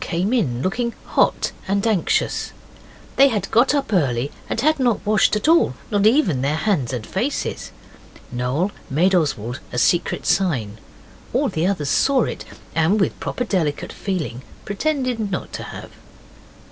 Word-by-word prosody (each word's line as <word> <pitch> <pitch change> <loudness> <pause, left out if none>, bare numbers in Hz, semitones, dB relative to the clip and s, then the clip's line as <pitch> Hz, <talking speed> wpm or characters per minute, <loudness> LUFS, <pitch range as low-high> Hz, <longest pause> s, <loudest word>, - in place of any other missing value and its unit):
came 185 +7 -1
in, 135 - 0
looking 235 +5 -1
hot - - +1 0.2
and 200 +2 0
anxious. 215 -7 0 0.6
They 275 - +8
had 220 -6 -2
got 250 +6 +4
up 275 -6 -1
early 135 -6 +1 0.2
and - - -1
had 310 +4 +2
not 245 -4 +1
washed 215 0 +3
at 210 - -1
all 325 - +4 0.2
not 205 0 +3
even 215 - +3
their 140 +3 +1
hands 155 - 0
and 120 -4 -4
faces. 245 +10 -3 0.6
Noel 125 +10 -1 0.2
made 175 +8 +2
Oswald 135 - 0
a - - -4
secret 170 +8 +1
signal. 125 - 0 0.6
All - - +2
the 160 +3 0
others 155 -8 -1
saw 270 -3 +3
it, - - -5 0.3
and 165 +6 +2
with 190 - 0
proper 250 - -3
delicate 170 -10 -1
feeling 165 - -3 0.2
pretended 250 -1 -1
not 180 - -4
to - - -5
have. - - -9
190 Hz, 155 wpm, -21 LUFS, 145-225 Hz, 0.6 s, They